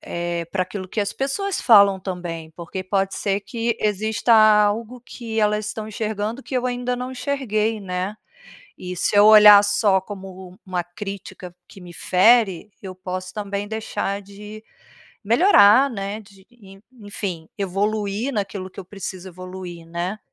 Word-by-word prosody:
eh, 170 -1 -4
pra 185 0 0
aquilo 185 0 -7
que 215 - -7
as 200 - -3
pessoas 370 +9 -2
falam 200 -5 +6
também, 175 -4 -6
porque 175 +2 -6
pode 195 0 -1
ser 200 0 -1
que 230 +3 -3
exista 215 +3 0
algo 215 +2 +4
que 230 -3 -6
elas 210 0 +1
estão 215 0 -5
enxergando 220 +3 -4
que 265 - -8
eu 250 - -1
ainda 245 0 -2
não 250 +1 -5
enxerguei, 225 -5 -1
né. 185 +2 -4 0.6
E 180 0 -6
se 205 - 0
eu 205 - +7
olhar 210 -1 +9
só 205 -1 +2
como 190 -2 -10
um 185 - -18
uma 180 -1 -2
crítica 185 -1 -9
que 195 - -14
me 175 -1 -12
fere, 205 0 +3
eu 190 -2 -7
posso 185 0 -6
também 200 -1 -4
deixar 210 -2 -3
de 210 +2 -11 0.6
melhorar 235 - +5
né, 200 -2 -5
de 195 -2 -20
e 205 -5 -16
en 195 - -20 0.2
enfim, 195 -5 -6
evoluir 205 +5 -2
naquilo 200 -3 -4
que 190 - -11
eu - - -7
preciso 190 -1 -7
evoluir, 180 -1 -9
né. 175 +5 -4
205 Hz, 160 wpm, -22 LUFS, 185-220 Hz, 0.6 s, olhar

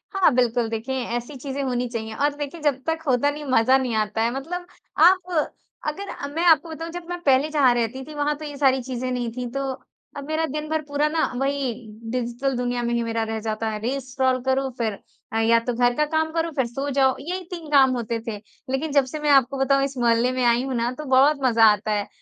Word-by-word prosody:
हाँ, 380 -5 +5
बिल्कुल 240 -2 +2
देखें 225 +4 -3
ऐसी 240 +1 -3
चीज़ें 275 +1 -5
होनी 250 -2 -1
चाहिए 220 -2 -5
और 290 +3 +1
देखें 295 +3 -6
जब 285 -3 +1
तक 320 0 0
होता 260 +2 +3
नहीं, 295 +1 -5
मज़ा 255 +2 +5
नहीं 255 -4 -2
आता 215 0 0
है 230 +1 +2
मतलब 350 +7 -5 0.4
आप 365 0 +2 0.6
अगर 395 +7 -4
अ, 280 - -5
मैं 320 +4 -3
आपको 335 0 +5
बताऊँ 325 +1 -6
जब 350 0 -7
मैं 355 - -4
पहले 275 +1 +3
जहाँ 285 -5 +4
रहती 240 +3 -2
थी, 310 - -10
वहाँ 295 0 0
तो 305 - -8
ये 290 -1 -7
सारी 265 -2 +3
चीज़े 255 0 -4
नहीं 245 -2 -2
थी, 250 +1 -5
तो 275 +1 -2 0.5
अब 280 0 -7
मेरा 315 +1 0
दिन 305 +1 -5
भर 315 0 0
पूरा 290 0 0
ना 315 +1 +1
वही 275 -2 0 0.4
डिजिटल 250 +2 -2
दुनिया 245 0 -1
में 235 0 -1
ही 235 - +1
मेरा 230 0 -1
रह 220 0 -3
जाता 220 0 -2
है, 215 -1 -4
रील्स 255 +3 -3
स्क्रॉल 260 -1 +1
करो 265 +1 +1
फिर 220 -4 -1 0.4
अ, 225 - +1
या 230 +1 +4
तो 240 +2 -3
घर 245 +1 +2
का 300 - +2
काम 315 +1 0
करो 330 0 -1
फिर 265 -4 +1
सो 270 +4 -4
जाओ, 265 -1 +3
यही 360 +7 -4
3 335 -3 -6
काम 270 -2 +6
होते 235 -1 -2
थे। 220 -2 -3 0.3
लेकिन 275 +4 -1
जब 280 -2 +4
से 285 +4 -6
मैं 300 0 0
आपको 275 -1 +4
बताऊँ 275 0 +3
इस 275 -1 -3
मोहल्ले 240 +1 +3
में 255 0 -1
आई 240 +1 +3
हूँ 265 0 -3
ना, 235 +1 0
तो 300 +4 -7
बहुत 275 +3 +4
मज़ा 230 -3 +5
आता 210 +1 -2
है, 205 -1 -1
265 Hz, 240 wpm, -23 LUFS, 240-295 Hz, 0.6 s, काम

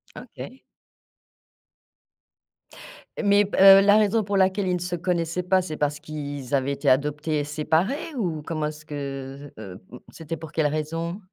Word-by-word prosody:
OK. 260 - -10 2.6
Mais 205 0 +4
b 205 - -5
heu, 195 0 +9
la 205 +1 +5
raison 215 +1 +2
pour 200 0 -1
laquelle 190 +1 +2
ils 180 - +1
ne - - -3
se 180 0 -3
connaissaient 175 0 -2
pas, 185 +1 +2
c'est 175 -4 -6
parce 150 0 -1
qu'i 150 -2 -6
ils 135 0 -3
avaient 135 0 0
été 140 - -4
adoptés 150 +3 +1
et - - -1
séparés 160 - -1
ou? 175 - -2
Comment 155 -1 -2
est-ce 150 0 -9
que, 140 -1 -7
heu, 100 -4 -9 0.2
mmh, 125 - -9
c'était 165 0 -7
pour 160 -2 -10
quelle 160 -3 +1
raison? 165 +4 -3
160 Hz, 170 wpm, -24 LUFS, 145-190 Hz, 2.6 s, heu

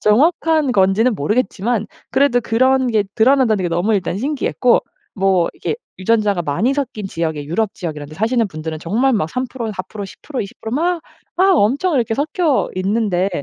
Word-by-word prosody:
정확한 310 +5 +3
건지는 205 +4 +3
모르겠지만 215 - -1 0.2
그래도 265 -2 +3
그런 260 +3 +2
게 215 -3 +2
드러난다는 235 -4 +3
게 175 - 0
너무 175 +6 +1
일단 190 -1 -1
신기했고 265 -1 +1 0.3
뭐 190 -3 +2
이게 - - -3 0.2
유전자가 205 -1 +1
많이 175 - 0
섞인 260 -7 -3
지역에 160 -5 -3
유럽 195 +8 -1
지역 165 -4 -5
이런 145 -1 -7
데 155 - -11
사시는 225 +3 +1
분들은 155 -1 -6
정말 225 +12 +1
막 200 -8 0
3% 250 +2 -4
4% 200 +2 -6
10% 260 +7 -7
20% 215 +2 -8
막 340 +5 0 0.4
막 375 0 +4
엄청 285 - +2
이렇게 235 -4 +1
섞여있는데 220 - 0
220 Hz, 325 characters per minute, -18 LUFS, 190-260 Hz, 0.4 s, 막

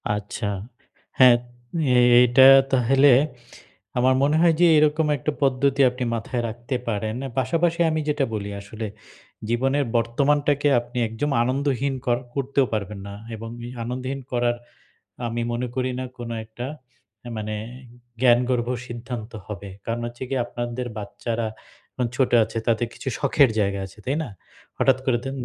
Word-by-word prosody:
আচ্ছা। 105 +1 -4 0.7
হ্যাঁ, 125 -2 +9 0.9
এটা 125 +2 +6 0.2
তা 135 - +3
হইলে 135 +2 +6 0.9
আমার 130 +1 +4
মনে 145 +2 +3
হয় 170 -1 +5
যে, - - +7
এরকম 155 +1 +3
একটা 145 +3 -2
পদ্ধতি 135 +1 +2
আপনি 125 +1 -5
মাথায় 120 +2 -3
রাখতে 120 +4 -5
পারেন। 110 0 -2
অ্যা 135 - -4
পাশাপাশি 165 +6 +1
আমি 155 0 0
যেটা 145 -2 +1
বলি 100 -1 -4
আসলে, 110 +2 -6 0.6
জীবনের 135 +4 +1
বর্তমানটাকে 145 +5 +1
আপনি 120 +1 -9
একদম 115 +7 -3
আনন্দহীন 135 +1 0
কর 120 -1 +2 0.2
করতেও 140 0 +1
পারবেন 105 -1 -3
না 100 - -7 0.2
এবং 115 +1 -7 0.2
এই 120 - -7
আনন্দহীন 130 +3 -4
করার 120 -1 +1 0.7
আমি 120 +1 -2
মনে 125 +1 -2
করি 130 0 0
না 130 - -3
কোন 120 -1 -6 0.2
একটা 110 +3 -7 0.6
এ - - -5
মানে 110 0 -3 0.7
জ্ঞানগর্ভ 125 -1 +3 0.2
সিদ্ধান্ত 120 -1 -6 0.2
হবে। 100 -1 -7 0.2
কারণ 115 +1 -2
হচ্ছে 120 +2 -8
গিয়ে, 135 -2 0
আপনারদের 120 +1 -4
বাচ্চারা 115 +2 -3 0.5
এ - - +3
ছোট 130 - +2
আছে, 110 +1 -6
তাদের 115 0 +2
কিছু - - -5
শখের 140 -1 +4
জায়গা 100 -1 0
আছে, 95 - -18
তাই 135 +4 0
না? 135 - -7 0.5
হঠাৎ 130 -1 +4
করে 125 -3 +2
তন 135 - -4
125 Hz, 150 wpm, -23 LUFS, 115-135 Hz, 0.9 s, হ্যাঁ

